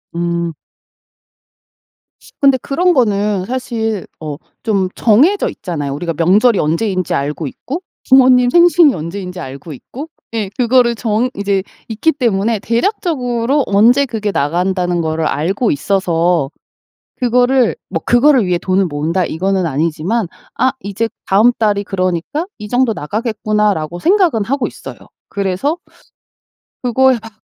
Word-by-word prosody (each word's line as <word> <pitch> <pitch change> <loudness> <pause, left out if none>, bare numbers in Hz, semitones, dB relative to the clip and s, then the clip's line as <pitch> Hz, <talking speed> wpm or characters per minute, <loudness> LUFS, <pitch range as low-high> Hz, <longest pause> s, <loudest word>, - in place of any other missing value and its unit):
음. 170 0 -2 1.9
근데 275 -2 +5
그런 355 +6 +1
거는 205 - +1
사실 225 -4 -3
어 150 -2 -5 0.3
좀 200 -5 0
정해져 285 - +3
있잖아요. 150 -6 -5
우리가 165 +3 -3
명절이 200 - +3
언제인지 185 +3 0
알고 145 +2 -2
있고 280 - -6 0.3
부모님 255 -2 +5
생신이 345 -3 +5
언제인지 180 +3 -6
알고 140 +1 -8
있고 270 - -9 0.3
예. 210 -4 -2
그거를 245 -1 +3
정 230 +2 -1
이제 200 -1 -1 0.2
있기 225 +9 +1
때문에 225 -5 0
대략적으로 255 - 0
언제 235 +8 +4
그게 220 -5 -3
나간다는 175 +2 0
거를 160 0 -1
알고 185 - 0
있어서 170 -2 0 0.6
그거를 250 0 +2
뭐 165 -3 -3
'그거를 250 -1 +4
위해 180 -1 +1
돈을 185 +2 +1
모은다.' 160 +5 -1
이거는 190 +2 -1
아니지만 165 - -1 0.3
아 260 +1 +2
'이제 205 +2 -2 0.2
다음 215 +6 +4
달이 205 -2 +1
그러니까 185 - -2
이 210 - -8
정도 245 +1 +1
나가겠구나.'라고 210 -3 -1
생각은 350 - +2
하고 260 +4 -1
있어요. - - -10 0.3
그래서 200 - -1 1.1
그거에 260 +1 +3
막 225 - -10
210 Hz, 295 characters per minute, -16 LUFS, 175-250 Hz, 1.9 s, 근데